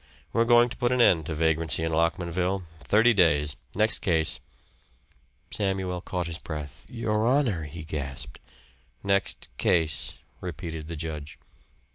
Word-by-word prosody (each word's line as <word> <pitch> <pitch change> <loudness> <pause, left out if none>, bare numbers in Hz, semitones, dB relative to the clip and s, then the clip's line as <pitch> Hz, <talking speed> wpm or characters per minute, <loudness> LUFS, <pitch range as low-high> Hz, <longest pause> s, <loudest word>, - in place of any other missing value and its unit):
We're 115 0 +3
going 120 0 +6
to 115 - -6
put 120 -1 +1
an 125 - +2
end 80 -9 +5
to 80 - -3
vagrancy 80 0 +1
in 80 - 0
Lockmanville. 90 +3 0
Thirty 115 +6 +4
days. 75 -7 +3 0.2
Next 110 +2 +3
case." 80 -4 +1 1.1
Samuel 95 -3 -1
caught 90 -1 -3
his 85 0 -5
breath. 75 -4 -7
"Your 110 -2 0
honor," 120 - +2
he 80 +2 -8
gasped. 70 -5 -5 0.6
"Next 100 0 0
case," 80 -6 +2 0.2
repeated 80 -3 -6
the 85 - -5
judge. 75 -2 -6
85 Hz, 135 wpm, -27 LUFS, 80-105 Hz, 1.1 s, going